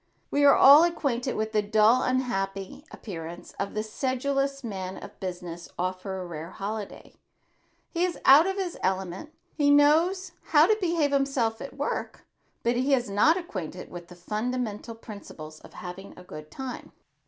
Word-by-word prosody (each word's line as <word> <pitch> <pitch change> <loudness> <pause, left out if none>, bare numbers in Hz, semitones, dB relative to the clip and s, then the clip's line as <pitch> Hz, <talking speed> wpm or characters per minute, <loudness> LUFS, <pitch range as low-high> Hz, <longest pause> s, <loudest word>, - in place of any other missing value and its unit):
We 285 - +2
are 280 - +8
all 285 +4 +9
acquainted 275 -7 -1
with 220 0 -2
the 215 -1 +2
dull 215 +4 +4
unhappy 195 -5 -2
appearance 170 -3 -8
of 200 - -3
the 215 - -1
sedulous 275 +4 -1
man 190 -4 -5
of - - -11
business 175 -2 -6
off 185 +1 -2
for 190 -1 -5
a 185 - -5
rare 165 -1 -7
holiday. 205 +2 -6 0.8
He 340 0 0
is 360 -1 -1
out 290 +6 +8
of 385 - -1
his 375 -3 -4
element. 190 - -2 0.2
He 290 -2 +2
knows 325 +6 +4
how 305 0 +5
to 430 - +3
behave 335 -5 +1
himself 275 -5 0
at 275 0 -8
work 285 - -4 0.4
but 235 +1 +1
he 265 +3 +3
is 245 -5 -3
not 260 - +4
acquainted 185 - -6
with 175 -1 -9
the 180 - -13
fundamental 220 +4 -3
principles 165 -8 -10
of - - -16
having 180 +2 -9
a 180 - -11
good 155 -3 -10
time. 265 - -7
225 Hz, 165 wpm, -27 LUFS, 190-280 Hz, 0.8 s, all